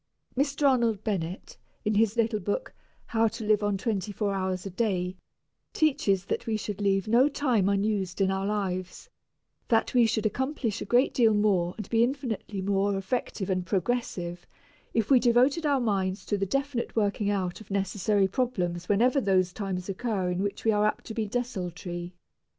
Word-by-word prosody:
Mr. 280 +2 +2
Arnold 235 -6 +2
Bennett, 185 -4 -3 0.3
in 215 - +2
his 220 +1 +2
little 225 -2 +1
book, 205 +1 -3 0.3
"How 225 0 +2
to 225 +1 -5
Live 210 0 +3
on 205 -1 0
Twenty 205 -2 -2
four 205 0 -1
Hours 185 -1 -2
a 195 - -5
Day," 185 -3 -1 0.6
teaches 200 - +2
that - - -3
we 220 -1 +1
should 210 -1 -5
leave 195 -1 +1
no 245 +6 +5
time 245 -9 +1
unused 200 -2 0
in 190 -1 +3
our 195 +1 -1
lives; 195 - -3 0.6
that 225 -2 +2
we 240 -2 +5
should 220 -1 -1
accomplish 250 0 -1
a - - -3
great 245 +3 +3
deal 225 -4 +4
more 190 -4 +2
and 215 -3 -6
be 230 0 +4
infinitely 240 -7 -3
more 200 0 +1
effective 195 0 -3
and 185 -1 -1
progressive 185 -3 -2 0.4
if 225 +2 0
we 260 - +7
devoted 255 +7 +3
our 280 -2 +3
minds 195 -4 -1
to 205 - 0
the 195 -1 -1
definite 275 +1 -2
working 205 -1 +1
out 190 -1 -2
of 215 - -14
necessary 200 0 +1
problems 180 -6 -2
whenever 245 +7 +3
those 185 -4 +2
times 190 -3 -4
occur 195 -2 -1
in 180 +1 -1
which 205 +2 -3
we 225 - +5
are 210 0 +3
apt - - -3
to 225 - -6
be 220 -1 -2
desultory. 180 -6 -4
205 Hz, 180 wpm, -28 LUFS, 190-235 Hz, 0.6 s, we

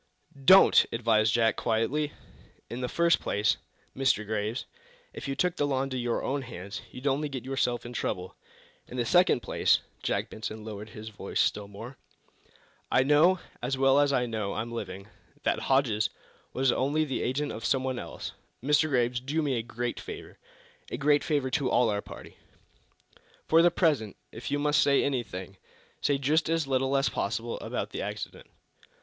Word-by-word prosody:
"Don't!" 190 +5 +8
advised 110 -2 +2
Jack, 115 0 +3
quietly. 135 +7 0 0.6
"In 120 +2 -4
the 125 - -2
first 170 0 +3
place, 100 -2 +1 0.4
Mr. 130 -5 +2
Graves, 110 +2 -2 0.5
if - - -7
you 135 - -2
took 180 +2 0
the 145 - +1
law 135 -2 +1
into 135 -1 -4
your 120 -2 -1
own 140 +1 -1
hands, 100 -5 -7
you'd 125 +2 -10
only 145 +2 +1
get 130 -3 -6
yourself 125 -3 -1
into 120 0 -4
trouble. 90 0 -3 0.5
In 125 - -8
the 120 - 0
second 175 -1 +4
place" - - +3 0.2
Jack - - -1
Benson 110 0 -6
lowered 105 0 -7
his 110 +1 -8
voice 105 - -5
still 105 -1 +1
more 115 +6 -10 0.9
"I 130 - +4
know, 150 +7 +5 0.2
as 130 +2 -1
well 135 +1 +4
as 145 -1 +3
I 125 -2 +2
know 110 -4 -3
I'm 115 +2 -4
living, 100 -4 -6 0.4
that - - +1
Hodges 120 -6 +2 0.4
was 130 0 +2
only 145 +5 +1
the 135 -4 -2
agent 145 +4 -1
of 110 - -7
some 130 +4 +1
one 130 -2 -2
else. - - -6 0.3
Mr. 150 +3 +3
Graves, 125 -2 +1
do 145 +5 -1
me 140 -2 0
a - - -1
great 120 +1 -4
favor - - -9 0.5
a - - -4
great 145 +2 +3
favor 145 -4 0
to 140 -3 +1
all 120 -3 +3
our 100 0 -1
party. - - -12 1.1
For 165 +1 +5
the 175 - +6
present, 150 - +1 0.2
if 115 - -7
you 145 - +1
must 150 +1 +3
say 140 -1 +4
anything, 100 -8 -3 0.4
say 145 - +2
just 150 +4 +1
as 165 -2 +1
little 135 0 +1
as 135 - +2
possible 115 +3 -2
about - - -4
the - - -4
accident. - - -6
130 Hz, 180 wpm, -28 LUFS, 110-145 Hz, 1.1 s, Don't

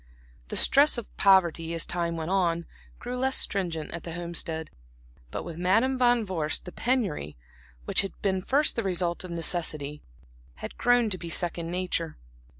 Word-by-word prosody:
The - - -5
stress 285 0 +6
of 235 - -7
poverty, 170 -4 +3
as 165 - 0
time 170 -1 -2
went 160 +2 -3
on, 170 -3 +1 0.3
grew 250 +1 -5
less 265 +1 +1
stringent 170 -6 -1
at 170 - -5
the 165 - -7
Homestead; 170 -2 -2 0.6
but - - -5
with 170 -1 -7
Madam 225 +9 +3
Van 245 -2 +3
Vorst 165 -5 -2
the 180 - -7
penury 195 - -1 0.5
which - - +3
had 195 - -6
been 190 -2 +1
first 280 +9 +2
the 230 - 0
result 180 -3 -1
of 185 - -8
necessity, 160 -4 -2 0.5
had - - -8
grown 245 -2 +3
to 185 - -2
be 170 - -6
second 170 0 0
nature. 175 -3 -2
175 Hz, 165 wpm, -27 LUFS, 165-205 Hz, 0.6 s, stress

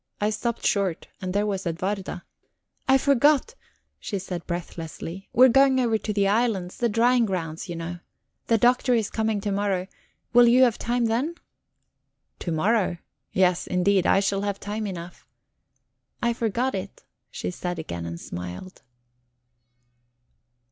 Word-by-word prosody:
I 210 +1 +1
stopped 235 +2 -3
short, 195 -5 0
and 185 -1 -3
there 205 +2 +1
was 195 -3 -2
Edwarda. 185 +1 -3 0.6
"I 265 0 +6
forgot," 285 - +3 0.5
she 205 - -4
said 180 -2 -6
breathlessly. 170 +1 -6
"We 250 +3 +7
were 250 - +4
going 270 0 +5
over 230 -3 +2
to 215 - -3
the 200 -1 +2
islands 200 -4 0
the 235 - +1
drying 235 +2 +3
grounds, 170 -2 -4
you 175 - -4
know. 170 +1 -5 0.5
The 230 - +4
Doctor 245 +2 +3
is 220 -3 0
coming 220 -1 0
to 205 - -2
morrow; 195 -2 0 0.5
will 240 0 +7
you 250 +2 +6
have 240 -4 +2
time 240 0 0
then?" 250 +9 0 1.0
"To 170 - -3
morrow? 185 +2 +1 0.3
Yes, 180 -2 +2
indeed. 185 +1 +2
I 195 - +4
shall 195 0 0
have 200 -1 -2
time 210 +1 -4
enough." 175 -2 -8 0.9
"I 235 0 +1
forgot 235 +3 -1
it," 195 +1 -6 0.3
she - - -4
said 180 -1 -4
again, 85 - -5
and 85 0 -6
smiled. 90 - -8
200 Hz, 150 wpm, -25 LUFS, 180-235 Hz, 1.0 s, We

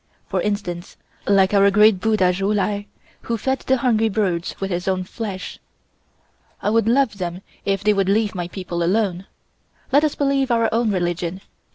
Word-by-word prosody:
For - - -1
instance, 200 -4 -4 0.3
like 195 -1 +4
our 200 0 +5
great 210 -1 +5
Buddha 200 -4 +2
Ju 195 +3 -1
Lai, 205 0 -1 0.3
who 235 - -2
fed 265 +5 -1
the 265 - +1
hungry 225 -3 +2
birds 190 -5 -1
with 195 0 -3
his 175 +1 -3
own 185 -1 0
flesh. 195 -1 -6 1.0
I 205 - -1
would 225 -1 +2
love 240 -4 +2
them 175 0 -4 0.2
if 195 0 0
they 210 +1 +4
would 195 -1 +1
leave 210 0 +2
my 175 -2 -4
people 175 -2 -5
alone. 190 0 0 0.6
Let 285 +3 +5
us 305 - +1
believe 275 -2 +1
our 230 -2 +2
own 230 0 +2
religion. 175 0 -2
200 Hz, 175 wpm, -21 LUFS, 185-225 Hz, 1.0 s, our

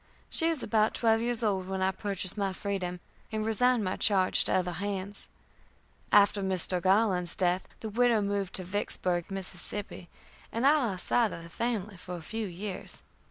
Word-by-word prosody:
She 330 -1 +2
was 320 -6 -2
about 215 -1 +2
twelve 225 -1 +3
years 240 0 -1
old 190 -4 0
when 190 0 -2
I 190 - +2
purchased 195 -1 -2
my 200 -2 -1
freedom, 185 -3 -4 0.3
and 215 -1 -2
resigned 240 +1 +2
my 185 -1 -2
charge 190 -3 +3
to - - 0
other 180 -1 +1
hands. 200 +2 -4 0.8
After 205 0 +5
Mr. 185 -1 +3
Garland's 185 -2 +2
death, 180 0 0
the 220 - -4
widow 235 +1 +3
moved 200 -2 -2
to 185 - -2
Vicksburg, 180 -2 0
Mississippi, 195 -1 -5 0.4
and 230 +3 -1
I 295 +2 +6
lost 190 -3 +2
sight 235 -3 +3
of 170 - -8
the 165 - -11
family 215 0 -3
for 180 +1 -7
a 165 - -10
few 220 +5 -4
years. 185 +2 -6
200 Hz, 175 wpm, -29 LUFS, 185-220 Hz, 0.8 s, I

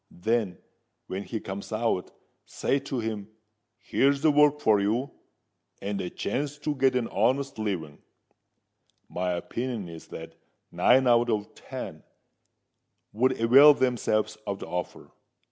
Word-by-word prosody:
Then, 110 0 -1 0.5
when 95 - -4
he 110 +2 -5
comes 100 +2 -7
out, 110 -4 -1 0.4
say 140 - 0
to 135 -1 -5
him, 110 -3 -4 0.5
'Here's 140 +4 +1
work 150 -1 +5
for 110 -7 +4
you, 115 +7 0 0.7
and 100 0 -3
a 90 - -4
chance 145 +8 -3
to 150 0 -2
get 135 -2 +2
an 120 -2 0
honest 130 +5 0
living.' 85 -9 -4 1.1
My 90 0 -2
opinion 115 +3 -4
is 80 -1 -10
that 80 0 -9 0.4
nine 130 +2 +4
out 120 -1 +4
of 105 -2 -2
ten - - -8 1.1
would 125 +5 +2
awail 135 +6 +8
themselves 110 -5 0
of 100 - -2
the - - -8
offer. 90 0 -5
115 Hz, 130 wpm, -27 LUFS, 100-130 Hz, 1.1 s, awail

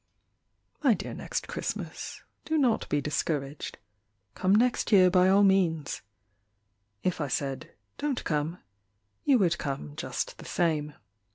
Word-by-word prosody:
My 265 -7 +5
dear - - -6
Next - - -4
Christmas, - - -5 0.2
Do 315 - 0
not 250 -6 +2
be 145 - +1
discouraged, 145 -1 -2 0.6
Come 190 +1 +3
next 240 +2 +2
year 185 -3 +7
by 185 0 +5
all 200 +1 +6
means; 175 -7 +2 1.0
If 180 -3 0
I 145 - 0
said 135 0 -3 0.2
"Don't 290 -4 -1
come" 155 +2 -1 0.7
You 275 -3 +5
would 170 -5 +2
come 135 - -4
just - - -4
the - - -10
same. 150 -4 0
175 Hz, 130 wpm, -28 LUFS, 150-205 Hz, 1.0 s, year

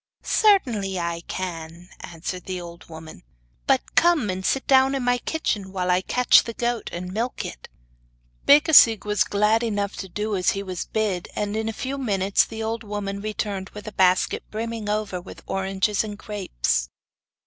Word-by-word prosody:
'Certainly 230 - +2
I 170 -1 -3
can,' 170 -1 -6
answered 175 +2 -6
the 185 -1 -4
old 170 -1 -11
woman. 160 - -10 0.5
'But - - +1
come 330 - +3
and 185 +1 -5
sit 270 +7 0
down 265 0 +4
in 265 - -2
my 245 0 +2
kitchen 210 -11 -2
while 185 -1 -1
I 180 +1 +3
catch 250 +6 +5
the 230 - -7
goat 240 -1 -2
and 180 +1 -6
milk 235 +4 -2
it.' - - -9 0.8
Becasigue 285 - +7
was 210 0 +2
glad 210 +2 +2
enough 205 -4 -2
to 190 - -6
do 210 +3 -2
as 185 -1 +2
he 200 - -3
was 185 -2 -5
bid, 205 -5 -1
and 210 0 -2
in 220 0 -1
a - - -1
few 265 +5 -4
minutes 200 -6 +2
the 225 0 -6
old 225 +1 -3
woman 200 -1 -4
returned 205 -2 -3
with 210 +1 -9
a - - -5
basket 185 -2 +2
brimming 225 -1 -4
over 210 -4 -2
with 185 - -12
oranges 195 +2 0
and 210 -1 -6
grapes. 60 - -2
205 Hz, 175 wpm, -24 LUFS, 185-225 Hz, 0.8 s, Becasigue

